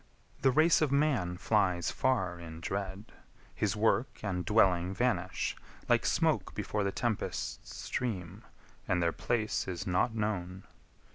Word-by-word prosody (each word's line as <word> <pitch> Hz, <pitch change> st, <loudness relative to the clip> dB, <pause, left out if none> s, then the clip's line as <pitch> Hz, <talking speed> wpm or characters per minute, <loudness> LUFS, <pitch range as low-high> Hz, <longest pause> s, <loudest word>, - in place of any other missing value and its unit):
The 135 Hz, -, +5 dB
race 155 Hz, +6 st, +4 dB
Of 150 Hz, -3 st, +2 dB
man 135 Hz, -12 st, +1 dB
flies 90 Hz, -4 st, +1 dB
far 95 Hz, -10 st, 0 dB
in 80 Hz, -1 st, -8 dB
dread; 95 Hz, +3 st, -4 dB, 0.4 s
his 105 Hz, -2 st, 0 dB
work 115 Hz, +4 st, +1 dB
and 90 Hz, -3 st, -1 dB
dwelling 95 Hz, -4 st, +3 dB
Vanish, -, -, 0 dB, 0.3 s
like -, -, +3 dB
smoke -, -, +1 dB
before 105 Hz, -1 st, -1 dB
the 100 Hz, -, 0 dB
tempest's 115 Hz, 0 st, -3 dB
stream, 100 Hz, -5 st, -4 dB, 0.4 s
And 90 Hz, -1 st, +2 dB
their 85 Hz, -, +2 dB
place 110 Hz, -5 st, -1 dB
is 90 Hz, 0 st, -4 dB
not 100 Hz, +5 st, +1 dB
known. 95 Hz, -4 st, -2 dB
100 Hz, 135 wpm, -31 LUFS, 90-115 Hz, 0.4 s, The